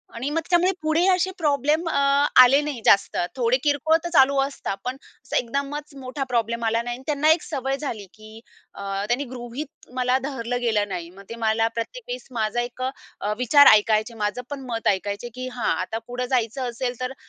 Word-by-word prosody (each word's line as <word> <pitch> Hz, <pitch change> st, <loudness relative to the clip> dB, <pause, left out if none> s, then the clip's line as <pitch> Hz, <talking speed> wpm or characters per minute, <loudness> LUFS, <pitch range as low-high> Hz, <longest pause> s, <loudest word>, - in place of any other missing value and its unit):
आणि 255 Hz, +5 st, -3 dB
मग 325 Hz, +2 st, -1 dB
त्यामुळे 360 Hz, +2 st, +4 dB
पुढे 315 Hz, +3 st, +2 dB
असे 375 Hz, +1 st, 0 dB
प्रॉब्लेम 300 Hz, +1 st, +1 dB
अ, -, -, 0 dB, 0.5 s
आले 275 Hz, +4 st, +5 dB
नाही 290 Hz, -6 st, -4 dB
जास्त, 200 Hz, -, +4 dB, 0.2 s
थोडे 245 Hz, 0 st, +2 dB
किरकोळ 300 Hz, +2 st, +3 dB
तर 345 Hz, -, -3 dB
चालू 275 Hz, -1 st, +5 dB
असतात, 270 Hz, -7 st, -3 dB
पण 255 Hz, +1 st, -2 dB, 0.3 s
अस -, -, -11 dB
एकदमच 280 Hz, +4 st, -4 dB
मोठा 260 Hz, +2 st, -4 dB
प्रॉब्लेम 235 Hz, -1 st, -1 dB
आला 230 Hz, +1 st, +1 dB
नाही 240 Hz, 0 st, -4 dB
आणि 260 Hz, -, -14 dB
त्यांना 300 Hz, +1 st, +2 dB
एक 325 Hz, -, +3 dB
सवय 270 Hz, -2 st, -2 dB
झाली 230 Hz, -9 st, -5 dB
की 215 Hz, +1 st, -13 dB, 0.3 s
अ, -, -, -10 dB, 0.3 s
त्यांनी 245 Hz, +5 st, 0 dB
गृहीत 250 Hz, +4 st, -8 dB
मला 250 Hz, 0 st, +2 dB
धरलं 245 Hz, -3 st, -3 dB
गेलं 215 Hz, -3 st, +1 dB
नाही, 175 Hz, -2 st, -5 dB
मग 195 Hz, +2 st, -14 dB
ते 230 Hz, -, -6 dB
मला 225 Hz, +1 st, +2 dB
प्रत्येक 465 Hz, -, -5 dB
वेळेस -, -, -6 dB
माझा 230 Hz, 0 st, -1 dB
एक 245 Hz, +1 st, -7 dB
अ, 210 Hz, -5 st, -5 dB
विचार 285 Hz, +4 st, +6 dB
ऐकायचे, 215 Hz, +2 st, +2 dB
माझं 210 Hz, +4 st, -1 dB
पण 285 Hz, -2 st, -5 dB
मत 225 Hz, 0 st, -2 dB
ऐकायचे 205 Hz, +4 st, -1 dB
की 255 Hz, 0 st, -5 dB
हा, 240 Hz, -3 st, -2 dB
आता 220 Hz, +4 st, -3 dB
पुढे 250 Hz, +1 st, -3 dB
जायचं 250 Hz, 0 st, -1 dB
असेल, 245 Hz, +1 st, -3 dB
तर 255 Hz, +1 st, -3 dB
250 Hz, 195 wpm, -23 LUFS, 230-285 Hz, 0.5 s, विचार